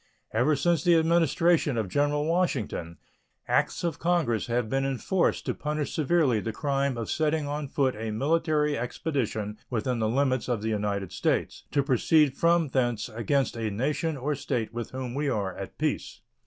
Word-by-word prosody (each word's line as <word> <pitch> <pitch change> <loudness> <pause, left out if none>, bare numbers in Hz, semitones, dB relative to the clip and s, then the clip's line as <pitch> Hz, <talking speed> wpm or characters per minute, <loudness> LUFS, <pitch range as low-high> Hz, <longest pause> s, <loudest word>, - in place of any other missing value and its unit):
Ever 125 +7 +3
since 165 +1 +1
the 175 -1 +5
Administration 165 -3 +3
of 110 -3 0
General 145 +6 +1
Washington 130 - -1 0.5
acts - - +1
of 170 -3 -2
Congress 165 -11 +1
have 120 -1 0
been 135 +4 0
enforced 135 +7 0
to - - 0
punish 150 -1 -3
severely 150 -6 +2
the 115 - -3
crime 140 +1 -1
of 115 - -3
setting 155 -1 0
on 145 0 -3
foot 135 -2 0
a 110 +1 -4
military 150 +5 +1
expedition 115 -5 -3
within 120 0 -1
the 110 -1 +1
limits 130 0 +1
of 115 -4 -1
the 110 - -1
United 100 -3 -2
States - - -1
to 140 - +1
proceed 140 +2 +3
from 170 -1 +3
thence 120 -3 0
against 120 +5 0
a 115 -2 -2
nation 145 - -1
or 140 +3 -1
state 115 -5 -3
with 120 -1 -4
whom 130 -2 -5
we 145 +1 -1
are 100 -6 -2
at - - -8
peace. - - -2
135 Hz, 170 wpm, -27 LUFS, 115-150 Hz, 0.5 s, the